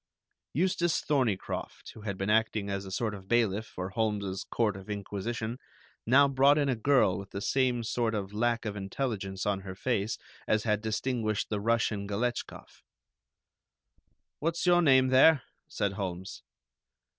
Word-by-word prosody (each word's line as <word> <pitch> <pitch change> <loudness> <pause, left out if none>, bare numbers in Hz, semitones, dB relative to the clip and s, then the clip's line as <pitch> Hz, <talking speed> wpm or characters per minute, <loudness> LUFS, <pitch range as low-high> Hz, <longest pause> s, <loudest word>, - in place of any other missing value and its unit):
Eustace 175 0 +1
Thorneycroft, 125 -10 -2
who 110 - -12
had 100 -3 -4
been 95 +2 -1
acting 110 -2 +1
as 100 0 -3
a 95 - -8
sort 110 +2 -1
of 95 -2 -10
bailiff 110 -2 +1
for 90 +1 -6
Holmes's 100 -3 -1
court 110 -5 0
of 95 +2 -10
inquisition, 110 +4 -4 0.5
now 140 +4 +6
brought 140 +2 +4
in 145 -2 +2
a 130 - +2
girl 115 -5 +3
with 100 0 -9
the 100 - -5
same 125 +3 +1
sort 115 0 -1
of 100 -1 -4
lack 115 +2 0
of 105 -1 -3
intelligence 100 -2 -3
on 100 -2 0
her 95 -1 -8
face 110 0 -1 0.3
as 110 0 +2
had 105 -2 +1
distinguished 110 -1 -1
the 105 - -1
Russian 110 -2 0
Galetchkoff. 120 +4 -4 1.6
"What's 165 +3 -1
your 175 -1 +5
name, 130 -4 +5
there?" 135 +2 +6 0.3
said 100 -2 -1
Holmes. 95 -1 -5
110 Hz, 155 wpm, -29 LUFS, 100-125 Hz, 1.6 s, now